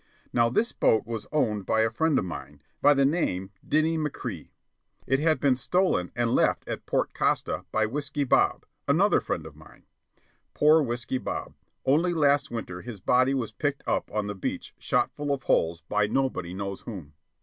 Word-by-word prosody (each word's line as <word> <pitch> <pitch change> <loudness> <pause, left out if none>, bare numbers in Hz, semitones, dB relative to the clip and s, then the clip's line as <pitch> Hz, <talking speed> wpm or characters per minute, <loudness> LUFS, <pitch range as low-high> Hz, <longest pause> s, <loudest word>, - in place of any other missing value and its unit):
Now 115 -1 +3
this 220 - +1
boat 110 - +2
was 115 -2 -5
owned 110 -10 0
by 110 - +3
a 110 0 +2
friend 160 +6 +1
of - - 0
mine, 75 -4 -8 0.2
by 145 - +6
name 135 - +1
Dinny 160 +2 +1
McCrea. 150 -2 -5 0.6
It 135 - +2
had 155 +1 +2
been 140 -3 +3
stolen 180 - +1
and 120 -1 +1
left - - +2
at - - -5
Port - - 0
Costa - - 0
by 110 0 +2
Whiskey 145 +4 -2
Bob, 135 - +2 0.2
another - - +4
friend - - -3
of - - -11
mine. - - -17 0.7
(Poor 155 +2 +5
Whiskey 120 0 -2
Bob! - - -5 0.3
Only 165 +6 +3
last 145 -1 +3
winter 90 -7 -5
his 120 -4 -8
body 130 +7 +3
was 120 -4 -2
picked 145 -1 -2
up - - -1
on 105 -1 -1
the 105 - -3
beach 95 - -5
shot - - +1
full 145 -1 -4
of 135 -1 -2
holes 85 +1 +1
by 105 0 0
nobody 105 -8 -1
knows 100 0 -5
whom.) 90 -10 -8
125 Hz, 180 wpm, -27 LUFS, 105-145 Hz, 0.7 s, by